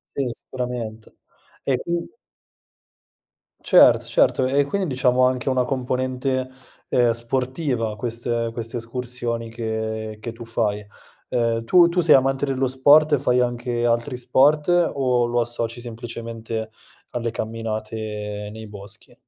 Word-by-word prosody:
Sì, 140 - 0
sicurament 120 -3 -6 0.5
E, 135 - +1
quind 170 - -3 1.5
Certo, - - +6
certo, 315 - +2
e 140 +2 +2
quindi 190 +6 -2
diciamo 130 -1 +2
anche 130 +1 0
una 130 -1 +2
componente, 130 0 -1 0.4
uhm, 120 -2 +3
sportiva 125 0 -1
queste 115 -1 -2
queste 115 +1 -4
escursioni 120 -1 -3
che 110 -1 -4
che 115 +2 -6
tu 115 +1 -10
fai. 105 -3 -1 0.5
Uhm, 115 -1 0
tu 175 +7 +6
tu 180 +1 +1
sei 165 -3 +6
amante 135 +1 +3
dello 135 0 0
sport 145 +4 +5
e 145 - +5
fai 125 -2 +2
anche 120 -1 -1
altri 120 +3 0
sport, 135 +5 +3
o 135 -8 +2
lo 120 0 +1
associ 120 0 -3
semplicemente 115 -1 -6 0.4
alle 120 -1 -2
camminate 110 -2 -4
nei 110 +1 -9
boschi? 100 -1 -10
120 Hz, 130 wpm, -22 LUFS, 115-130 Hz, 1.5 s, Certo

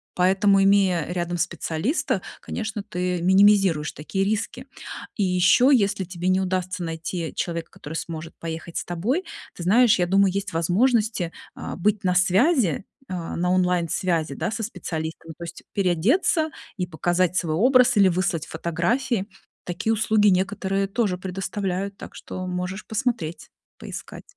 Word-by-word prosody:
Поэтому, 195 +2 +4
имея 195 -4 +3
рядом 175 -1 -2
специалиста, 175 - -1 0.2
конечно, 215 -2 -4
ты 180 -3 -2
минимизируешь 190 -5 +4
такие 190 +6 -2
риски. 215 +2 -2 0.5
И 205 - 0
ещё, 180 +8 +4
если 205 -6 +3
тебе 180 0 -5
не 185 0 +3
удастся 185 -1 -2
найти 165 0 -4
человека, 170 -1 -3
который 150 +2 -9
сможет 165 0 -5
поехать 165 0 -6
с - - -3
тобой, 220 - -1 0.3
ты 175 - -7
знаешь, 230 +4 +5
я 175 - +2
думаю, 195 +1 +3
есть 200 -2 -3
возможности, 205 +1 +1 0.2
а, - - -6
быть 205 +3 +1
на 180 - +2
связи, 190 - +3 0.2
а, 175 -3 -4
на 180 +1 0
онлайн-связи, 175 -4 +1
да, - - -2
со 225 - -3
специалистами, 165 -5 -5
то 170 - -8
есть 170 0 -9
переодеться 245 - +2 0.3
и 180 - -1
показать 175 +1 0
свой 165 -4 0
образ 250 +3 +5
или 195 -2 +6
выслать 175 -3 0
фотографии. 190 +8 -1 0.4
Такие 175 +5 -1
услуги 215 -1 +3
некоторые 195 +1 +1
тоже 200 -3 0
предоставляют, 195 +1 -3
так - - -10
что 185 0 -6
можешь 180 +2 -4
посмотреть, 220 -9 -2 0.3
поискать. - - -8
185 Hz, 145 wpm, -24 LUFS, 175-205 Hz, 0.5 s, или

